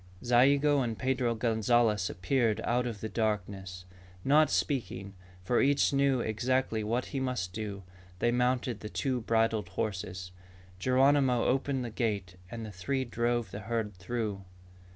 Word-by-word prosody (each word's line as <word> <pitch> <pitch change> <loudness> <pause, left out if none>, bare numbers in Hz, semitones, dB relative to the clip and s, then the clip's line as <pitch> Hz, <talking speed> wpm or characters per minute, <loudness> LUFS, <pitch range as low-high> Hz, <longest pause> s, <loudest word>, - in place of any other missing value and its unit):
Zayigo 140 +4 +4
and 115 -3 -2
Pedro 130 -2 0
Gonzalez 110 -2 +2
appeared 110 +5 0
out 125 +1 +1
of 110 -4 -6
the 110 - -2
darkness. 100 -5 -3 0.4
Not 150 +3 +5
speaking, 100 -8 -2 0.3
for 120 +6 +2
each 140 +1 +3
knew 135 -2 +3
exactly 115 0 0
what 120 +4 -1
he 135 - 0
must 125 -9 -2
do, 105 -2 -5 0.3
they 120 +5 +2
mounted 125 -2 0
the 105 - -7
two 130 0 -1
bridled 110 -3 +1
horses. 95 -2 -4 0.5
Geronimo 130 +1 +3
opened 135 0 0
the 115 - -5
gate 100 -6 -2
and 115 +1 -6
the 110 - -7
three 130 +8 -2
drove 120 -3 -1
the 100 - -6
herd 110 0 -2
through. 100 +1 -4
115 Hz, 145 wpm, -30 LUFS, 105-130 Hz, 0.5 s, Not